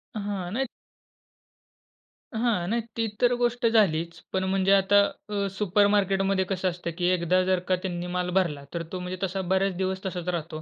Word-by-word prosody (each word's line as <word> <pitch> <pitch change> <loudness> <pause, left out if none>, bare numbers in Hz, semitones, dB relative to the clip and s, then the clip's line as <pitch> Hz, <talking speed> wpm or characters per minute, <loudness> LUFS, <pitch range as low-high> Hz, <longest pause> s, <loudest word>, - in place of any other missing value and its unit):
हां, 200 -4 -3
नाही 265 +2 0 1.7
हां, 220 -7 +1
नाही, 235 +1 +1 0.2
ती 225 - +1 0.2
तर 245 0 +5
गोष्ट 240 0 +1
झालीच. 170 -7 +2
पण 190 0 +1
म्हणजे 190 0 +1
आता 195 +1 +4 0.3
अ, 200 -1 -1
सुपरमार्केटमध्ये 195 -1 +2
कसं 185 0 -1
असतं 170 -1 -5
की 175 - 0
एकदा 180 0 +2
जर 185 -1 +2
का 185 - +3
त्यांनी 175 -1 -3
माल 180 0 0
भरला, 150 -7 0
तर 170 -1 -2
तो 185 - -4
म्हणजे 180 +1 -5
तसा 190 +1 -1
बरेच 190 -1 +2
दिवस 190 0 -2
तसाच 180 -2 -4
राहतो. 160 -2 -3
190 Hz, 170 wpm, -26 LUFS, 180-200 Hz, 1.7 s, तर